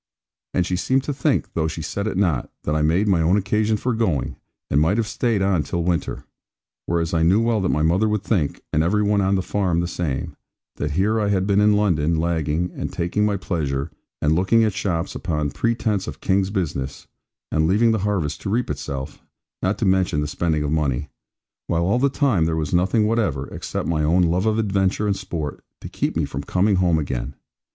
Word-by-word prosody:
And 90 Hz, -, +2 dB
she 90 Hz, 0 st, -1 dB
seemed 130 Hz, +7 st, +1 dB
to 145 Hz, -, -2 dB
think, 145 Hz, +1 st, 0 dB
though 80 Hz, -1 st, 0 dB
she 80 Hz, 0 st, -5 dB
said 100 Hz, +6 st, -3 dB
it 95 Hz, -, -2 dB
not, 85 Hz, -10 st, +1 dB
that 75 Hz, -, -1 dB
I 75 Hz, -, +1 dB
made 85 Hz, +7 st, +2 dB
my 90 Hz, -5 st, +3 dB
own 85 Hz, +5 st, +3 dB
occasion 105 Hz, +2 st, +1 dB
for 125 Hz, +4 st, -1 dB
going, 100 Hz, -, 0 dB, 0.4 s
and 70 Hz, -, +4 dB
might 85 Hz, +7 st, +2 dB
have 115 Hz, -, +1 dB
stayed 110 Hz, -2 st, 0 dB
on 95 Hz, -4 st, +2 dB
till 85 Hz, +2 st, -2 dB
the 90 Hz, -, 0 dB
winter. 85 Hz, -4 st, -2 dB, 0.6 s
Whereas 85 Hz, -1 st, 0 dB
I 80 Hz, -, +2 dB
knew 90 Hz, +6 st, +4 dB
well 115 Hz, -2 st, +1 dB
that 95 Hz, -, 0 dB
my 75 Hz, -, +1 dB
mother 90 Hz, +7 st, +2 dB
would 105 Hz, -2 st, -1 dB
think 85 Hz, -11 st, -1 dB
(and 75 Hz, -, +3 dB
every 105 Hz, +6 st, +2 dB
one 105 Hz, 0 st, +2 dB
on 95 Hz, +1 st, +2 dB
the 95 Hz, -, 0 dB
farm 90 Hz, -4 st, 0 dB
the 85 Hz, -, 0 dB
same) 80 Hz, -6 st, -3 dB, 0.4 s
that 75 Hz, -, -2 dB
here 105 Hz, +4 st, +2 dB
I 105 Hz, -, +1 dB
had 95 Hz, -2 st, +1 dB
been 100 Hz, 0 st, +3 dB
in 105 Hz, 0 st, +5 dB
London, 85 Hz, -6 st, +2 dB
lagging, 80 Hz, +1 st, 0 dB
and -, -, -4 dB
taking 105 Hz, +5 st, 0 dB
my 100 Hz, -1 st, 0 dB
pleasure, 70 Hz, -7 st, -2 dB, 0.3 s
and 75 Hz, +1 st, +3 dB
looking 95 Hz, +7 st, +3 dB
at 110 Hz, -3 st, +1 dB
shops, 95 Hz, -3 st, -2 dB
upon 75 Hz, -5 st, -2 dB
pretence 110 Hz, -, 0 dB
of -, -, -7 dB
King's 95 Hz, 0 st, +1 dB
business, 75 Hz, -9 st, -3 dB, 0.5 s
and 80 Hz, 0 st, +2 dB
leaving 110 Hz, +6 st, +4 dB
the 110 Hz, -, +1 dB
harvest 95 Hz, -8 st, -1 dB
to -, -, -4 dB
reap 120 Hz, +4 st, 0 dB
itself, 70 Hz, +2 st, -5 dB, 0.4 s
not 95 Hz, +2 st, 0 dB
to 110 Hz, -, -1 dB
mention 95 Hz, -5 st, +2 dB
the 75 Hz, -, -1 dB
spending 75 Hz, 0 st, -1 dB
of 75 Hz, -, -2 dB
money; 75 Hz, -2 st, 0 dB, 0.6 s
while 85 Hz, 0 st, +1 dB
all 100 Hz, +8 st, +2 dB
the 140 Hz, +2 st, +3 dB
time 130 Hz, -, +2 dB
there 80 Hz, 0 st, 0 dB
was 75 Hz, 0 st, -2 dB
nothing 95 Hz, +5 st, +3 dB
whatever, 105 Hz, -, 0 dB
except -, -, -4 dB
my 80 Hz, -2 st, 0 dB
own 85 Hz, +4 st, +3 dB
love 90 Hz, +5 st, +1 dB
of 110 Hz, 0 st, +2 dB
adventure 100 Hz, -1 st, +1 dB
and 100 Hz, -1 st, +1 dB
sport, 85 Hz, -7 st, -5 dB, 0.2 s
to -, -, -8 dB
keep -, -, -2 dB
me -, -, +1 dB
from 70 Hz, -, -5 dB
coming 95 Hz, +5 st, +1 dB
home 90 Hz, -3 st, +3 dB
again. 70 Hz, -3 st, -3 dB
90 Hz, 220 wpm, -22 LUFS, 80-105 Hz, 0.6 s, in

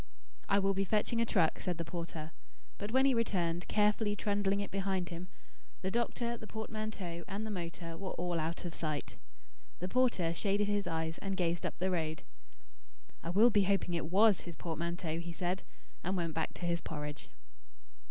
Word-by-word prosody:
"I 200 Hz, -, +5 dB
will 195 Hz, 0 st, +3 dB
be 195 Hz, 0 st, +1 dB
fetching 215 Hz, +4 st, +2 dB
a 230 Hz, -, +2 dB
truck," 170 Hz, -8 st, +3 dB
said 180 Hz, -3 st, -1 dB
the 170 Hz, -, -2 dB
porter. 165 Hz, -2 st, -5 dB, 0.5 s
But 205 Hz, +1 st, -3 dB
when 265 Hz, +2 st, +5 dB
he 270 Hz, -, +5 dB
returned, 180 Hz, -7 st, +1 dB
carefully 210 Hz, 0 st, +3 dB
trundling 200 Hz, -1 st, +1 dB
it 200 Hz, -, -3 dB
behind 190 Hz, -2 st, 0 dB
him, 175 Hz, +1 st, -6 dB, 0.6 s
the 190 Hz, -, 0 dB
doctor, 235 Hz, +1 st, 0 dB
the 220 Hz, -, -9 dB
portmanteau, 215 Hz, -6 st, -4 dB
and 205 Hz, +2 st, -3 dB
the 220 Hz, -, -3 dB
motor 170 Hz, -3 st, -4 dB
were 190 Hz, +3 st, -4 dB
all 175 Hz, -1 st, -1 dB
out 165 Hz, +3 st, -2 dB
of 170 Hz, -, -3 dB
sight. 155 Hz, -3 st, -3 dB, 0.6 s
The 180 Hz, -, -3 dB
porter 215 Hz, -8 st, +3 dB
shaded 200 Hz, +3 st, +1 dB
his 205 Hz, -2 st, +1 dB
eyes 160 Hz, 0 st, -1 dB
and 195 Hz, -1 st, -2 dB
gazed 175 Hz, -2 st, +1 dB
up -, -, -7 dB
the 185 Hz, +1 st, +1 dB
road. 160 Hz, -3 st, -1 dB, 1.0 s
"I 165 Hz, -, -4 dB
will 215 Hz, +7 st, +6 dB
be 205 Hz, -2 st, +4 dB
hoping 195 Hz, -2 st, +2 dB
it 165 Hz, -2 st, 0 dB
WAS 205 Hz, +2 st, +6 dB
his 170 Hz, -2 st, -7 dB
portmanteau," 170 Hz, 0 st, -2 dB
he 170 Hz, 0 st, -5 dB
said, 180 Hz, +2 st, -1 dB, 0.4 s
and 185 Hz, +2 st, 0 dB
went 165 Hz, -2 st, -1 dB
back 160 Hz, 0 st, -1 dB
to 175 Hz, -, -4 dB
his 170 Hz, -1 st, +1 dB
porridge. 150 Hz, -1 st, -5 dB
185 Hz, 185 wpm, -34 LUFS, 170-205 Hz, 1.0 s, will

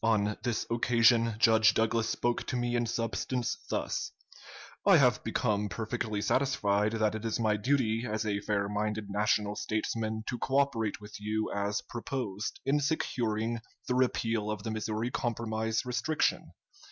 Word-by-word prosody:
"On 105 Hz, -2 st, +2 dB
this 120 Hz, -3 st, -1 dB
occasion 115 Hz, -1 st, +4 dB
Judge 110 Hz, -1 st, +5 dB
Douglas 115 Hz, 0 st, +1 dB
spoke 120 Hz, +1 st, 0 dB
to 130 Hz, -, -2 dB
me 120 Hz, 0 st, 0 dB
in 120 Hz, -1 st, +1 dB
substance 115 Hz, +2 st, -1 dB
thus: -, -, -2 dB, 0.7 s
'I -, -, +7 dB
have -, -, +3 dB
become 105 Hz, -1 st, 0 dB
perfectly 110 Hz, +1 st, -3 dB
satisfied 105 Hz, -6 st, +1 dB
that 110 Hz, -1 st, +1 dB
it 110 Hz, 0 st, -5 dB
is 115 Hz, 0 st, -1 dB
my 110 Hz, -2 st, +2 dB
duty, 115 Hz, 0 st, +1 dB
as 110 Hz, +1 st, -2 dB
a 100 Hz, -1 st, 0 dB
fair 100 Hz, -1 st, -1 dB
minded 105 Hz, 0 st, -2 dB
national 105 Hz, 0 st, +1 dB
statesman, 110 Hz, 0 st, -2 dB
to 120 Hz, -, -3 dB
cooperate 130 Hz, -6 st, +1 dB
with 105 Hz, 0 st, -12 dB
you 110 Hz, +1 st, -2 dB
as 100 Hz, 0 st, -1 dB
proposed, 115 Hz, -4 st, -4 dB
in 140 Hz, +2 st, +3 dB
securing 115 Hz, -6 st, -1 dB, 0.3 s
the 125 Hz, -, +1 dB
repeal 115 Hz, -4 st, +1 dB
of 105 Hz, -2 st, -3 dB
the 110 Hz, -, -3 dB
Missouri 110 Hz, +2 st, -2 dB
Compromise 110 Hz, -1 st, -1 dB
restriction. 125 Hz, +5 st, 0 dB
110 Hz, 150 wpm, -30 LUFS, 105-120 Hz, 0.7 s, I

